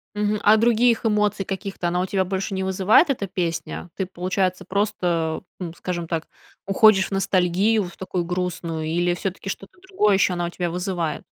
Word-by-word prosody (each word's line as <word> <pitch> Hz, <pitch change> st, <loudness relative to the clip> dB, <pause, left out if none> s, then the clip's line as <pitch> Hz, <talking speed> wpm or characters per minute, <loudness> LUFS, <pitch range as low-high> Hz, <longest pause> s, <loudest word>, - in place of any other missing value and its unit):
Мгм, 210 Hz, 0 st, 0 dB
а 215 Hz, +1 st, +6 dB
других 235 Hz, +1 st, +3 dB
эмоций 210 Hz, -2 st, +1 dB
каких-то 195 Hz, -1 st, -4 dB
она 180 Hz, +1 st, 0 dB
у 185 Hz, -, 0 dB
тебя 190 Hz, 0 st, 0 dB
больше 190 Hz, +2 st, -3 dB
не 190 Hz, 0 st, -2 dB
вызывает, 190 Hz, -, +4 dB
эта 210 Hz, -7 st, -1 dB
песня? 175 Hz, -1 st, -3 dB
Ты, 190 Hz, -, -2 dB
получается, 185 Hz, 0 st, -1 dB
просто, 180 Hz, -5 st, -1 dB, 0.2 s
ну, 175 Hz, -3 st, -4 dB
скажем 175 Hz, -2 st, -4 dB
так, 165 Hz, -1 st, -2 dB, 0.4 s
уходишь 195 Hz, -1 st, +5 dB
в -, -, -17 dB
ностальгию 195 Hz, +2 st, +2 dB
в 175 Hz, -, -10 dB
такую 185 Hz, -1 st, -3 dB
грустную 170 Hz, -2 st, -3 dB
или 175 Hz, +2 st, +1 dB
всё-таки 195 Hz, +1 st, -5 dB
что-то 195 Hz, -, -7 dB
другое 210 Hz, -, +3 dB
ещё 190 Hz, -1 st, +3 dB
она 175 Hz, -1 st, -1 dB
у -, -, -4 dB
тебя 175 Hz, 0 st, -3 dB
вызывает? 175 Hz, -3 st, -2 dB
190 Hz, 180 wpm, -23 LUFS, 175-200 Hz, 0.4 s, а